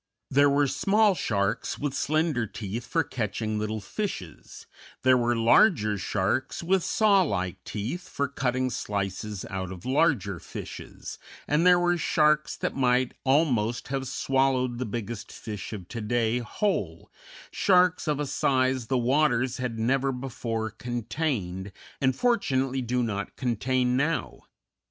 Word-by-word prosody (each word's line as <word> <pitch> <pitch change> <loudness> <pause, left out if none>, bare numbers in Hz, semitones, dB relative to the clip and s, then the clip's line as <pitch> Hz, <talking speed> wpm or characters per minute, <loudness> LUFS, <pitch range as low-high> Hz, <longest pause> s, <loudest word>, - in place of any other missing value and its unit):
There 140 +1 +5
were 145 +1 +3
small 205 +8 +3
sharks 105 - -1
with 145 -2 -2
slender 155 -5 0
teeth 110 +4 -6
for - - +1
catching 110 -2 -3
little 110 +1 -2
fishes, 100 - -6 0.4
there 130 0 +6
were 120 -1 +2
larger 115 - +4
sharks 100 - -1
with 185 +1 +2
saw 205 -3 +4
like 95 - -2
teeth 120 - -5
for 140 - -1
cutting 130 -1 -1
slices 100 -1 -3
out 95 -1 -4
of 90 -2 -9
larger 130 - +1
fishes, - - -8 0.3
and 155 +4 +3
there 180 0 +7
were 175 0 +2
sharks 150 -1 +2
that - - -3
might 125 -1 +2
almost 125 -6 +1
have 135 -1 -2
swallowed 130 -2 +1
the 125 - -2
biggest 115 0 -5
fish 105 -4 -7
of 95 -5 -7
to 115 - -5
day 115 +2 +1
whole, 120 - -2 0.4
sharks 180 -3 +3
of 150 -1 0
a 150 - 0
size 130 -3 +1
the 130 - +1
waters 130 0 +2
had 125 -3 -3
never 135 +4 +1
before 115 -4 -4
contained, 115 - -3 0.3
and 130 -2 +2
fortunately 135 - +1
do 125 0 0
not 100 -3 -3
contain 125 0 0
now. 145 +5 -1
125 Hz, 140 wpm, -27 LUFS, 110-140 Hz, 0.4 s, there